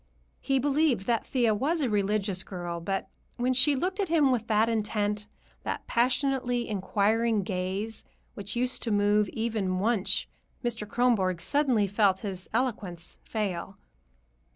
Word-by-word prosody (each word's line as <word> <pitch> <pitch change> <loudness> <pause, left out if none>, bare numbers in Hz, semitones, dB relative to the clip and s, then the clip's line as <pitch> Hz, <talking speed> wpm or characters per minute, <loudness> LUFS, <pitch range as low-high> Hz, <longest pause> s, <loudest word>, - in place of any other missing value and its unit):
He 270 -1 +1
believed 280 -5 +2
that 235 0 0
Thea 240 -4 +2
was 300 +10 0
a 270 - +2
religious 200 -3 0
girl, 175 -2 -5
but 195 +3 -2 0.3
when 250 +1 +1
she 280 +3 +5
looked 370 +8 -2
at 390 -4 0
him 305 -5 +4
with 230 -3 0
that 220 0 +3
intent, 210 -2 -1 0.3
that - - -4
passionately 245 0 +1
inquiring 215 +2 +1
gaze 190 +4 -3 0.3
which 200 +2 -4
used 250 +1 -1
to 235 - -2
move 205 0 +3
even 215 -5 -1
Wunsch, 205 -1 +1 0.4
Mr. 230 -3 -2
Kronborg 210 -8 +2
suddenly 255 - +2
felt 200 -1 +2
his 190 -3 -5
eloquence 210 -8 -2
fail. 195 -3 -3
215 Hz, 140 wpm, -28 LUFS, 195-250 Hz, 0.4 s, she